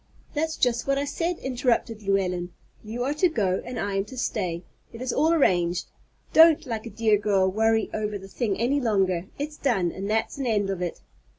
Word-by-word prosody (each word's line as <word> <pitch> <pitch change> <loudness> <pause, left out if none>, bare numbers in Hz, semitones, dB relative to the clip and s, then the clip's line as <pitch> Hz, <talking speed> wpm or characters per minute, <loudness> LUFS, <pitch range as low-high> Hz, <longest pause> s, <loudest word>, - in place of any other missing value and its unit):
"That's 315 +1 -1
just 240 0 +1
what 275 0 +2
I 280 - 0
said," 335 +4 -2
interrupted 240 -3 -1
Llewellyn; 185 -3 0 0.3
"you 225 +3 -4
are 275 +3 0
to 350 +4 +3
go 195 - 0
and 245 -2 -5
I 200 0 -2
am 195 - 0
to 260 +3 -11
stay. 180 -8 -2 0.3
It 230 - -10
is 255 0 -2
all 310 +4 +3
arranged. 180 - +2 0.4
Don't, 320 0 +7
like 230 -3 -4
a - - -6
dear 215 -1 +2
girl, 200 -2 +2
worry 220 +2 +2
over 210 -1 -2
the 195 0 -11
thing 200 -1 -2
any 270 +5 +1
longer. 190 -6 +1
It's 295 +1 -5
done, 195 -11 +1
and 195 +2 -5
that's 220 +5 -1
an 265 - -1
end 205 -3 +1
of 185 -2 -4
it." 175 -2 -4
220 Hz, 205 wpm, -25 LUFS, 195-265 Hz, 0.4 s, Don't